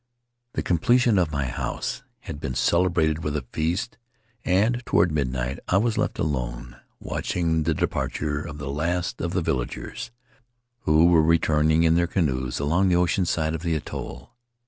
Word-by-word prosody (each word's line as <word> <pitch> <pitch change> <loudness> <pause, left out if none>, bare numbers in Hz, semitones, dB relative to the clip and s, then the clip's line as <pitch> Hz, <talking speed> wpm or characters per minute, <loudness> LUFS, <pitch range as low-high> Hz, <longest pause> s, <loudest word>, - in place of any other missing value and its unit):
The - - -2
completion 115 +5 +3
of 85 -4 +1
my 70 -3 -1
house 60 - -3 0.2
had 70 - -7
been 65 -4 -4
celebrated 80 -2 +2
with 75 0 -2
a 70 - -5
feast, 90 +12 -2 0.4
and 110 +7 +2
toward 90 - +2
midnight 65 -3 -2
I 95 - +3
was 110 +2 +1
left - - -1
alone, - - -3 0.2
watching 80 -2 -1
the 80 -1 +1
departure 75 0 -2
of 75 -1 -7
the 70 -2 -5
last 85 +5 -2
of 85 +1 -2
the 90 -2 0
villagers, 65 -6 -3 0.8
who 75 +2 +5
were 85 -2 +6
returning 80 0 +3
in 80 -1 +4
their 85 +1 +2
canoes 65 -8 -1
along 85 +7 +2
the 90 - +3
ocean 90 +1 +2
side 80 -2 0
of 80 - -3
the 85 -1 0
atoll. 80 +9 -6
80 Hz, 165 wpm, -25 LUFS, 75-90 Hz, 0.8 s, were